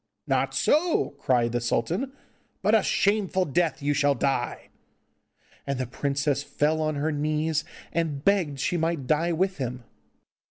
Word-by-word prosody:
'Not - - 0
so!' 325 - +2
cried 120 -4 +2
the 120 0 -1
sultan, 170 - -1 0.5
'but - - +3
a - - +6
shameful 195 -2 +1
death 160 0 0
you 145 +1 +2
shall 145 -1 +2
die!' 135 -3 -1 1.0
And 140 -1 -1
the 130 - -1
princess 140 +3 -1
fell 150 +2 0
on 155 -1 0
her 150 +3 0
knees, 155 +1 0 0.3
and 155 -4 -1
begged 175 -9 +2
she 175 - 0
might 165 -4 -1
die 160 +5 +1
with 185 +3 0
him. 125 -2 -4
150 Hz, 145 wpm, -26 LUFS, 140-170 Hz, 1.0 s, a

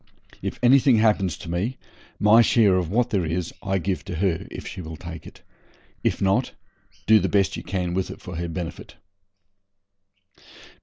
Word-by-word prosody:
If - - -4
anything 130 +1 +6
happens 105 -5 +2
to - - -11
me 95 +10 -2 0.4
my 105 +3 +6
share 110 -4 +4
of 90 -3 0
what 115 +5 +1
there 100 -4 +1
is 85 +1 -3
I 95 -1 -1
give 95 +1 -2
to 90 - -5
her, 85 -1 -1
if - - -8
she - - -7
will 80 -1 -8
take 85 -1 -9
it. - - -15 0.6
If - - 0
not, 95 0 +1 0.5
do 110 0 +6
the 95 - -1
best 100 -2 +2
you - - -5
can 90 -3 -3
with 95 0 -1
it - - -8
for 90 -4 -8
her 85 0 -3
benefit.' 85 0 -6
95 Hz, 175 wpm, -24 LUFS, 85-105 Hz, 0.6 s, anything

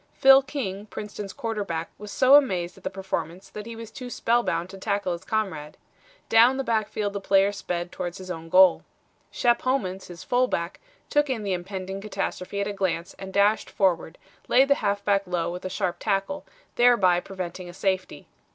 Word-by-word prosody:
Phil 270 0 +7
King, 215 -8 -5
Princeton's 205 -1 -7
quarterback, 200 -8 -3
was 210 0 -8
so 260 +4 +4
amazed 185 -12 +4
at - - -18
the - - -2
performance 190 -1 -5
that 210 +2 -8
he 230 - -7
was 225 -1 -9
too 250 +2 -8
spellbound 230 -9 0
to 195 +1 -10
tackle 200 -2 -1
his 170 +1 -4
comrade. 190 -9 -3 0.5
Down 240 +4 +6
the 270 - -1
backfield 215 -3 -1
the 200 - -4
player 195 +1 +3
sped 175 -3 -4
towards 175 0 -5
his 185 -1 -7
own 165 -1 -7
goal. 185 0 +6 0.5
Shep 240 -1 +2
Homans, 195 -8 -1
his 175 -2 -10
fullback, 245 -9 0 0.3
took 295 -1 +3
in 235 -5 -2
the 195 -2 -1
impending 190 +1 -5
catastrophe 200 -1 -4
at 200 - -1
a 205 - -3
glance 180 -3 -2
and 190 0 -7
dashed 200 +2 +2
forward, 185 -6 0 0.3
laid 265 +3 +4
the - - +7
halfback 200 -1 +1
low 175 -2 -1
with 180 +1 -7
a - - -2
sharp 180 -1 -2
tackle, 205 +8 -1 0.3
thereby 215 -8 +5
preventing 180 -1 -7
a - - -7
safety. 190 -1 -2
195 Hz, 180 wpm, -25 LUFS, 180-225 Hz, 0.5 s, Phil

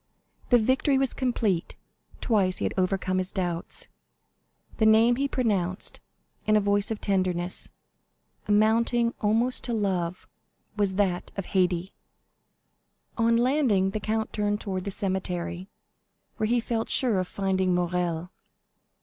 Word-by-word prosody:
The 245 - +6
victory 260 +4 +2
was 270 -2 +1
complete; 225 -9 -1 0.5
twice 195 -6 +1
he - - -2
had - - -1
overcome 185 0 0
his 185 0 -2
doubts. 175 -3 -4 0.9
The 220 - +3
name 225 +2 +5
he 280 +1 +1
pronounced, 200 -9 -1 0.5
in 215 - +4
a - - +6
voice 205 0 +1
of 220 -2 -3
tenderness, 185 -2 -1 0.8
amounting 230 +3 +2
almost 225 +4 +3
to 240 - -2
love, 185 -5 -2 0.5
was 200 -3 0
that 185 -3 0
of 195 - -3
Haydée. 180 -1 0 1.2
On 230 0 +3
landing, 240 -7 +2
the 215 - -3
count 220 +1 -2
turned 205 0 0
towards 190 -4 -4
the - - -2
cemetery, 185 -1 -3 0.7
where 215 - 0
he 240 +2 +2
felt 230 -1 -2
sure 235 -7 +3
of 185 - -2
finding 190 -2 0
Morrel. 175 -1 -1
200 Hz, 130 wpm, -26 LUFS, 185-230 Hz, 1.2 s, The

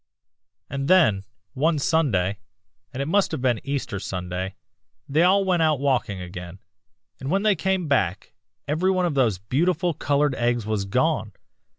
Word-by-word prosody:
"'And 135 0 -3
then, 110 - +4 0.3
one 155 +4 +1
Sunday, 105 - +1 0.5
and 135 - -3
it - - -5
must 200 +4 +2
have 160 - -3
been 120 -4 +1
Easter 135 -8 -3
Sunday, 90 0 -4 0.5
they 150 +4 +2
all 190 +3 +4
went 180 -3 +2
out 155 -3 +2
walking 125 -8 0
again, 90 0 -8 0.6
and 135 - -5
when 195 +4 +1
they 210 -2 +4
came 185 -1 -1
back 100 -10 0 0.3
every 160 +6 +1
one 185 -1 +2
of 170 - 0
those 120 -8 +2
beautiful 165 - 0
colored 145 0 +1
eggs 120 -3 0
was 105 -2 -1
gone. 125 -1 0
140 Hz, 160 wpm, -24 LUFS, 100-165 Hz, 0.6 s, then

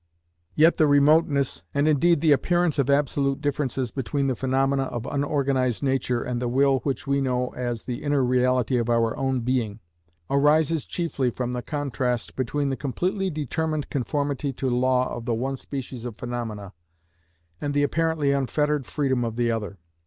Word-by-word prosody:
Yet 160 +3 +5
the 155 - +4
remoteness, 145 -1 +3
and 140 +2 +2
indeed 155 +1 +3
the 160 - +4
appearance 175 +2 +2
of 140 0 +1
absolute 140 -1 +1
difference 135 -4 -2
between 140 +2 -2
the 130 -2 0
phenomena 135 +2 +1
of 120 -3 -5
unorganised 140 -3 0
nature 130 -3 0
and 125 -1 -3
the 125 - -1
will 135 +2 +3
which 135 0 -3
we 140 0 +1
know 125 -1 0
as 120 -2 -4
the 120 -1 -5
inner 145 -2 +1
reality 125 -1 +2
of 120 0 -2
our 115 -1 +2
own 130 -2 -1
being, 115 -4 -1 0.5
arises 150 +2 +2
chiefly 160 -7 -1
from 125 +1 -3
the 125 0 -3
contrast 125 -5 -2
between 140 +2 -1
the - - -1
completely 180 - -2
determined 155 0 -2
conformity 140 +1 -1
to 130 - -3
law 125 +1 +2
of 120 - -7
the 120 -2 0
one 135 +4 -2
species 130 -3 -6
of 120 -3 -6
phenomena, 110 -4 -5 0.9
and 145 -1 -2
the 145 - +3
apparently 160 -1 +1
unfettered 145 +1 0
freedom 130 -4 0
of 115 -1 -3
the 120 -1 +1
other. 105 -3 -4
135 Hz, 165 wpm, -25 LUFS, 125-145 Hz, 0.9 s, Yet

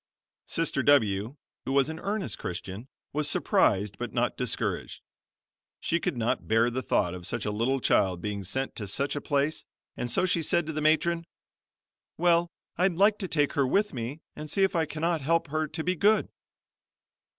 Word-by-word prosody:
Sister - - 0
W 110 -4 +3 0.3
who - - -2
was 140 0 +3
an 160 0 -5
earnest 195 - -3
Christian, 95 +6 -6 0.3
was 150 0 0
surprised 100 -5 +2
but - - -4
not - - 0
discouraged. - - -3 0.8
She 170 - 0
could 140 - -2
not 115 0 -1
bear 115 +2 +3
the 130 +2 -2
thought 90 -7 +1
of 90 -1 -6
such - - -3
a 105 - 0
little 120 +6 0
child 95 -7 +2
being 100 +1 -4
sent 130 +9 -3
to 105 - -4
such 140 +9 -1
a 145 - -3
place 145 +2 0 0.3
and 120 - -3
so 120 - +2
she 180 -2 +1
said 170 +1 +1
to 160 - -4
the 155 - -2
matron: 165 +2 +2 0.9
"Well, 170 0 +3 0.3
I'd 180 -1 +3
like 205 +4 +4
to 190 - -3
take 145 -4 +1
her 140 -2 +2
with 205 +9 +1
me 125 +5 -5
and 155 0 -7
see 195 +6 +1
if 190 - +2
I 165 -1 +2
cannot 160 +2 -1
help 165 +2 +1
her 155 +1 -1
to 160 +1 -5
be 180 +2 0
good." 210 +5 +3
145 Hz, 185 wpm, -28 LUFS, 115-170 Hz, 0.9 s, like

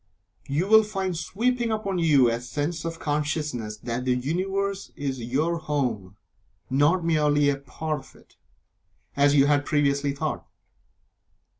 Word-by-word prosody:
You 145 +6 0
will 220 +1 +8
find 195 -4 -3
sweeping 235 +8 -1
upon 200 -4 -1
you 145 -7 +5
a 115 0 -1
sense 150 +6 -3
of 165 0 -4
consciousness 145 -7 -2
that 120 +1 -3
the 125 -1 +1
Universe 195 +8 -2
is 135 -3 -3
your 150 +8 0
home 125 -11 -2 0.6
not 150 +6 +3
merely 150 -3 +3
a 140 - 0
part 155 +2 -4
of - - -17
it, - - -22 0.8
as 145 +1 +4
you 140 -1 +6
had 145 0 +3
previously 140 -1 +1
thought. 140 - -3
150 Hz, 140 wpm, -25 LUFS, 140-170 Hz, 0.8 s, will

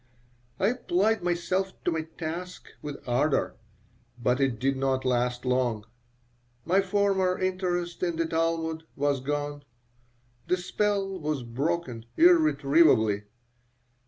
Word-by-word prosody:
I 195 - +3
applied 220 -2 +1
myself 180 +2 -1
to - - +1
my 160 -1 -1 0.2
task 175 +3 -6
with 145 -3 -8
ardor, 135 +5 +1 0.6
but 125 +2 +1
it 130 -4 +1
did 135 +4 0
not 130 0 0
last 125 0 0
long. 125 -4 0 0.8
My 185 +4 +3
former 195 -1 +1
interest 180 -2 -2
in 175 -2 0
the 165 0 0
Talmud 160 0 -1
was 145 -1 +1
gone. 145 +2 -3 0.9
The 180 - +2
spell 195 +1 -1
was 150 -4 -2
broken 125 -1 -2
irretrievably. 155 - +4
160 Hz, 115 wpm, -27 LUFS, 130-185 Hz, 0.9 s, irretrievably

